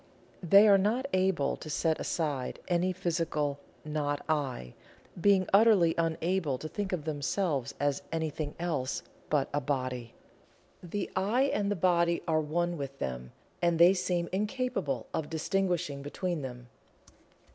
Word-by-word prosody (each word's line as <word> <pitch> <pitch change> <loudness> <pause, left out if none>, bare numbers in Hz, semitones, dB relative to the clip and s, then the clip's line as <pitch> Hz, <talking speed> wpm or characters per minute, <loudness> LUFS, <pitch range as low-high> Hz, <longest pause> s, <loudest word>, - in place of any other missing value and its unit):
They 200 +4 +7
are 200 -1 +7
not 225 +7 +1
able 185 -6 +2
to 155 - -9
set 160 +1 0
aside 145 -6 -2
any 180 +1 +1
physical 165 -5 -1 0.3
"not 145 -1 -2
I," 135 - -2 0.5
being 195 -1 +4
utterly 200 -6 +6
unable 165 -2 0
to 155 - -6
think 200 +4 -4
of 170 -5 -3
themselves 150 -1 -1
as 145 0 0
anything 155 -2 -3
else 150 -7 -2 0.3
but 145 -3 +2
a 145 - +1
Body. 130 -3 -3 0.7
The 190 +3 -4
"I" 210 +8 +2
and 200 -1 0
the 205 - +1
Body 170 -1 +2
are 155 -1 +2
one 170 +2 -1
with 135 -1 -5
them, 65 - -4 0.3
and 170 -1 +2
they 170 +3 +7
seem 180 -2 -1
incapable 205 - -1
of 155 - -2
distinguishing 170 -3 -1
between 170 +3 -3
them. 125 -2 -8
165 Hz, 140 wpm, -30 LUFS, 145-185 Hz, 0.7 s, They